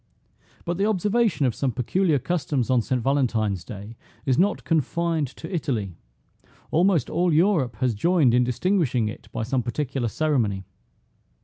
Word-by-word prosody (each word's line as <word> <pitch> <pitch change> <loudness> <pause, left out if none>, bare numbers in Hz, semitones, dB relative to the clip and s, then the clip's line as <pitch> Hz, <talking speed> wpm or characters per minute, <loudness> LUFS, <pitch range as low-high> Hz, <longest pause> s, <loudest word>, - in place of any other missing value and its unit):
But 175 +2 -2
the 200 - +2
observation 210 - +1
of 125 - +1
some 135 +2 -1
peculiar 155 - +1
customs 140 -4 -1
on 125 -2 +4
St. 130 +2 -1
Valentine's 115 -9 0
day 105 0 -9 0.3
is 130 - +2
not 200 +3 +2
confined 165 0 0
to 160 +7 -10
Italy; 115 - -2 0.8
almost 170 -4 +3
all 180 0 +1
Europe 160 - +2
has 130 -3 0
joined 150 - +3
in 125 0 +4
distinguishing 125 - +1
it 110 - -10
by 115 - -3
some 130 +3 0
particular 130 +1 -2
ceremony. 115 -8 0
135 Hz, 145 wpm, -24 LUFS, 120-170 Hz, 0.8 s, on